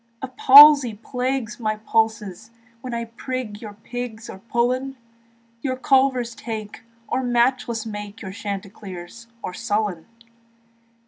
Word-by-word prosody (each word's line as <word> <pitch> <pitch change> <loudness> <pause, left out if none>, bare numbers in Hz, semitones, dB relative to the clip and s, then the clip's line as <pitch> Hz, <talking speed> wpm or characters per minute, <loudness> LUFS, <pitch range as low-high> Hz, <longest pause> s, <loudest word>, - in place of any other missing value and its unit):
The 265 - -4
palsy 275 -2 +8
plagues 250 +1 -3
my 215 -2 -1
pulses 220 -2 -1 0.3
When 255 - -6
I 235 0 -3
prig 230 -2 -6
your 215 -3 -8
pigs 225 +1 -7
or 190 - -11
pullen, 250 +5 -1 0.6
Your 260 0 -2
culvers 260 -2 +2
take, 220 -3 -7 0.3
or 260 - -1
matchless 240 -2 0
make 210 -1 -7
Your 190 - -6
Chanticleer 195 -3 -7 0.4
or 180 - -5
Sullen. 205 -4 -2
230 Hz, 120 wpm, -22 LUFS, 210-255 Hz, 0.6 s, palsy